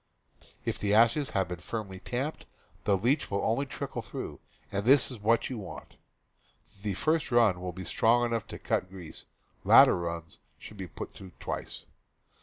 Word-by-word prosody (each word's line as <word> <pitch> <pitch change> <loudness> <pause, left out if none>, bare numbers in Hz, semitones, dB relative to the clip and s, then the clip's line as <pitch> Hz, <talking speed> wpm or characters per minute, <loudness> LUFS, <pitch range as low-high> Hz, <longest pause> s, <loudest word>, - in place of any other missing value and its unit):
If - - -2
the 105 0 +2
ashes 120 +6 +4
have 95 -2 +2
been 90 -1 -5
firmly 100 -1 -5
tamped, 130 +9 -4 0.4
the 100 - +3
leach 125 +9 +1
will 100 0 -1
only 120 +6 +1
trickle - - -5
through, - - -7 0.3
and 100 0 -1
that 120 - +1 0.2
is 125 - -8
what 115 +3 +2
you 125 - -4
want. 100 - -9 0.8
The 100 -2 -2
first 155 - +1
run 110 -7 +4
will 90 0 -3
be 95 +1 -8
strong 120 +7 +3
enough 115 -2 -2
to - - -7
cut 90 - -1
grease; 90 -4 -10 0.4
later - - +8
runs 85 -2 -5 0.2
should 110 - -11
be 95 -2 -5
put - - -8
through 95 -3 -11
twice. - - -5
105 Hz, 175 wpm, -29 LUFS, 95-120 Hz, 0.8 s, later